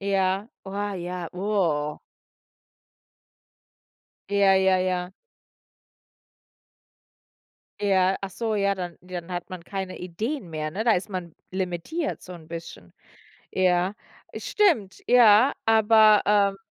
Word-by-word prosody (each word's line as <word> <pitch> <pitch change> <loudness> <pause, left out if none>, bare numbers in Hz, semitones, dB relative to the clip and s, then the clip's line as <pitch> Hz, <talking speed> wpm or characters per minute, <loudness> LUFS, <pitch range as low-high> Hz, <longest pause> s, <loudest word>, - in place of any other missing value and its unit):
Ja, 195 +1 0 0.2
wa 200 +1 -4
ja, 175 -1 -5
oh. 175 -7 -1 2.3
Ja, 200 -1 +4
ja, 190 -1 +3
ja. 180 0 -2 2.7
Ja, 190 -2 +2
ach 195 - -5
so, 220 +3 -2
ja, 200 -1 +1
dann 180 -3 -6
dann 180 -1 -7
hat 175 -1 -5
man 180 -2 -8
keine 190 0 -5
Ideen 195 - -4
mehr, 155 -1 -3
ne? 210 +7 -3
Da 230 - +5
ist 185 +3 -1
man 180 -4 -6 0.2
limitiert 190 - -3
so 180 - -10
'n 170 -3 -12
bisschen. 160 - -9 0.6
Ja, 185 +1 +2 0.4
es - - -6
stimmt, 280 - +1
ja, 240 +1 +6
aber, 220 -1 +6 0.3
äh - - -27
190 Hz, 115 wpm, -25 LUFS, 180-205 Hz, 2.7 s, ja